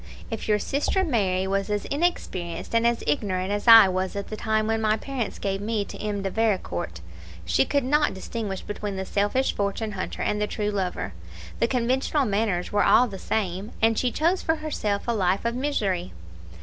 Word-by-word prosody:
If 225 - -4
your 210 -1 +3
sister 290 - 0
Mary 195 - +1
was 195 +1 -1
as 205 0 -1
inexperienced 280 - -2
and 230 0 +4
as 235 0 0
ignorant 185 +5 -1
as 205 +3 -2
I 225 -3 +10
was 185 +1 -2
at 200 0 -4
the 215 - -4
time 215 0 0
when 225 0 0
my 215 0 +2
parents 245 -3 -4
gave 195 0 -2
me 210 -1 -1
to - - -9
M. 205 -2 -3
de 195 - -2
Vericourt, 180 - -1 0.4
she 135 +9 +3
could 285 -2 +1
not 295 -3 +2
distinguish 195 0 -4
between 205 -1 -5
the 190 0 -3
selfish 205 +8 +1
fortune 205 +2 -2
hunter 190 -2 -4
and 210 0 0
the 210 - +1
true 210 0 -2
lover; 180 - -2 0.5
the 230 - +3
conventional 260 +4 +1
manners 200 -4 0
were 205 0 +3
all 250 - +5
the 195 -4 -8
same, 195 0 -2
and 225 0 +3
she 250 - +1
chose 335 +8 +1
for 320 - +1
herself 250 -10 -2
a 235 - +2
life 190 0 +1
of 235 - +1
misery. 210 -10 -1
210 Hz, 195 wpm, -25 LUFS, 195-235 Hz, 0.5 s, I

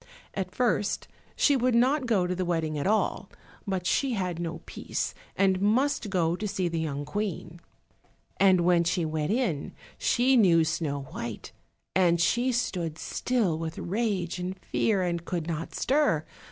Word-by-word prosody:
At 190 -2 -3
first 230 -4 0 0.3
she 285 - +4
would 250 -1 +2
not 260 +3 +3
go 205 -6 +2
to 180 - -1
the 185 +1 -2
wedding 165 -3 -1
at 145 +4 -1
all, 215 +1 0 0.4
but 190 -2 -2
she 260 +7 +1
had 180 -5 -2
no 170 -1 -4
peace, - - -3 0.2
and 190 -1 +2
must 240 +3 +2
go 170 -3 +1
to 210 +3 -3
see 195 -3 -1
the 165 -1 -2
young 145 -2 -3
Queen. 175 -1 -4 0.8
And 190 -2 +5
when 175 0 +4
she 170 0 0
went 155 0 -2
in 210 - -1 0.3
she 255 +2 +3
knew 170 -7 +5
Snow 150 -3 -2
white; 115 -3 -6 0.4
and 175 -2 +4
she 240 +9 +2
stood 175 -10 -2
still 210 -10 0
with 165 -1 -4
rage 190 -3 -1
and 185 +1 -4
fear, 190 +2 0
and 170 -1 -1
could 170 -2 -3
not 165 -1 -4
stir. 265 - +2
180 Hz, 165 wpm, -28 LUFS, 165-215 Hz, 0.8 s, And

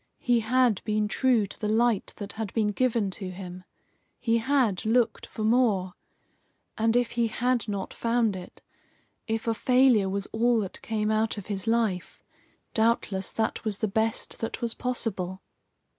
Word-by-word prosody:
He 245 -2 +2
had 235 -2 +2
been 215 -1 0
true 240 -1 +2
to - - -11
the 210 - -2
light 225 -1 +1
that 205 -1 -6
had 220 -3 -4
been 215 -2 +2
given 225 -2 +1
to 190 0 -4
him. 180 -1 -8 0.5
He 230 0 +2
had 230 -6 +1
looked 225 0 +1
for 215 - -6
more. 215 -6 +2 0.8
And 225 +1 +1
if 245 -1 +2
he 235 -1 +1
had 245 +1 0
not 200 -2 -4
found 230 -3 +1
it, 180 -1 -10 0.6
if 225 0 -2
a 230 - +3
failure 250 -4 +4
was 200 +1 -2
all 235 +2 +2
that 195 - -6
came 215 -1 -1
out 220 0 +1
of 200 - -6
his 200 -1 -4
life, 225 -6 0 0.5
doubtless 220 -4 +1
that 220 -1 -1
was 215 -3 -2
the 215 - 0
best 220 +2 0
that 225 - -4
was 235 -1 -2
possible. 195 -7 -3
220 Hz, 165 wpm, -27 LUFS, 200-235 Hz, 0.8 s, failure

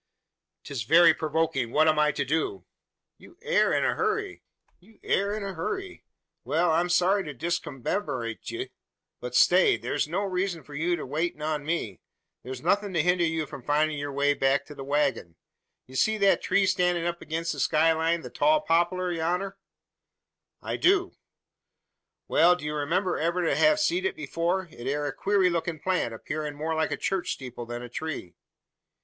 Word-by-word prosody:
"'Tis 140 -5 -5
very 165 +8 +6
provoking! 155 -6 -1
What 155 +4 +4
am 155 -1 +3
I 150 0 +4
to 145 - -2
do?" 160 - -2 0.5
"You 345 - -17
air 485 +1 +3
in - - +2
a - - +2
hurry? 400 -2 -2 2.0
Wal 165 +2 +1
I'm 170 +2 +1
sorry 185 +3 +3
to 150 -4 -7
discommerdate 135 - -3
ye. - - -5 0.5
But 125 0 -6
stay! 180 +8 +5
Thur's - - -2
no 175 +6 -1
reezun 185 -3 -2
for 145 - -12
yur 165 +2 -1
waitin' 150 +3 -2
on 150 -1 -2
me. 145 - -3 0.4
Thur's 130 0 -7
nuthin' 205 -2 +1
to 160 - +3
hinder 180 0 +2
ye 160 -1 0
from 140 -2 -9
findin' 150 +3 +1
yur 145 0 -4
way 140 +1 +2
to 140 +2 0
the 140 -2 -8
waggon. 140 - -1 0.5
Ye 130 - -16
see 215 +11 +2
that 200 -1 +3
tree 200 - +2
stannin' 180 -2 +1
up 175 0 -3
agin 160 +1 -3
the 165 - -3
sky 160 +1 +3
line 165 +1 0
the - - -9
tall 305 0 +3
poplar 175 - +1
yonner?" 180 +4 -2 1.0
"I - - -3
do." 370 0 +3 1.2
"Wal; 175 +2 +5
do 175 - -9
you 150 - -2
remember 170 +6 0
ever 170 +3 0
to - - +2
hev 310 0 +4
seed 355 +5 +1
it 380 - -2
afore? 185 - -1
It 120 -5 -9
air 145 +2 -1
a 145 - -2
queery 195 +1 +2
lookin' 170 -1 -2
plant, 180 -6 0
appearin' 150 +6 -5
more 155 +2 -2
like 160 0 0
a - - -2
church 190 -2 -1
steeple 125 -3 -8
than 120 0 -5
a - - -6
tree." 145 - -5
165 Hz, 170 wpm, -27 LUFS, 145-180 Hz, 2.0 s, very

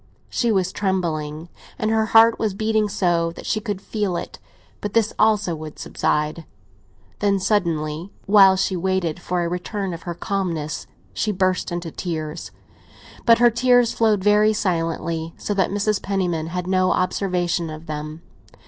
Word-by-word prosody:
She 235 -2 +1
was 190 -3 +1
trembling, 165 -5 -2 0.3
and 215 - 0
her 220 0 +2
heart 225 +1 +6
was 215 -4 -1
beating 215 0 +1
so 175 -4 +1
that - - -10
she 215 - 0
could 205 -2 -4
feel 200 -3 -2
it; - - -7 0.4
but 205 0 -5
this 225 -2 +2
also 210 -5 +3
would 155 -1 -8
subside. 150 +2 -1 0.8
Then, 200 -1 +2
suddenly, 170 -4 -1 0.2
while 195 -2 +7
she 190 0 0
waited 180 -2 -1
for 175 0 -1
a - - -1
return 180 +2 -3
of 170 - -7
her 175 -1 -5
calmness, 170 -6 -3 0.3
she 215 - 0
burst 185 -2 0
into 175 -1 -4
tears. 160 -2 -5 0.8
But 230 0 +7
her 240 0 +5
tears 245 0 +3
flowed 215 -4 +2
very 210 +1 +4
silently, 165 -4 -2
so 205 - -3
that 190 -3 +1
Mrs. 205 +1 0
Penniman 180 -5 -1
had 180 +1 -3
no 185 0 +2
observation 180 -2 0
of 155 +1 -8
them. 155 +1 -6
185 Hz, 155 wpm, -22 LUFS, 170-210 Hz, 0.8 s, while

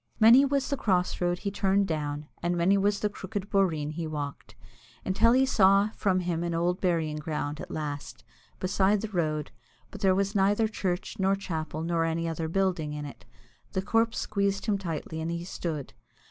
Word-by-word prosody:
Many 235 +5 +8
was 275 -1 0
the 280 - +1
cross 185 -6 0
road 175 0 +1
he 200 +2 -3
turned 195 0 +2
down, 150 -2 -3
and 175 +1 0
many 180 +4 +4
was 200 +1 +1
the 210 - +2
crooked 200 0 -6
boreen 165 -7 +1
he 160 +1 -4
walked, 145 -2 -6 0.5
until 220 +5 +4
he 260 +1 +4
saw 200 -3 +4
from 185 -3 +1
him 170 -2 -1
an 170 -1 -2
old 175 +2 0
burying 165 -4 0
ground 150 -1 -3
at - - -8
last, 145 -8 -5 0.4
beside 195 +2 +2
the 220 - -4
road, 155 -6 -1 0.4
but - - -9
there 190 -2 +4
was 200 +1 0
neither 205 +2 +3
church 195 -1 -3
nor 190 +1 +3
chapel 160 -5 -4
nor 165 0 +1
any 165 +1 -1
other 165 0 -2
building 175 -4 0
in 150 0 -5
it. 140 - -10 0.5
The 190 -1 -1
corpse 225 +3 +1
squeezed 200 -1 -1
him 205 -3 +1
tightly, 160 -3 -4
and 160 - -2
he 170 0 -3
stood. 160 -5 -5
180 Hz, 190 wpm, -28 LUFS, 160-200 Hz, 0.5 s, Many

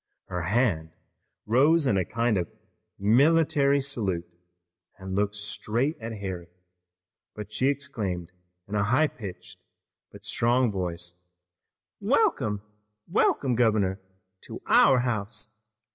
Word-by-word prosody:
Her 90 -1 -2
hand 90 -5 0 0.5
rose 145 +8 +4
in 125 - +2
a 95 - +2
kind 115 +4 0
of 90 -4 -1 0.5
military 140 +6 +4
salute, 105 -11 -2 0.7
and 95 -1 -7
looking 105 +1 0
straight 115 +7 -1
at 115 0 -5
Harry 95 -5 -5 1.0
she 110 +5 +1
exclaimed 105 -12 -2 0.4
in 100 - -9
a 105 -1 +2
high 130 +8 +3
pitched 95 -7 -8 0.5
but - - -12
strong 120 0 +2
voice: 90 -2 -4 0.9
"Welcome, 105 -2 +1 0.4
welcome, 130 -3 +2
governor, 105 -5 +2 0.4
to - - -7
our 130 -2 +5
house! 110 -2 -3
105 Hz, 110 wpm, -27 LUFS, 95-130 Hz, 1.0 s, our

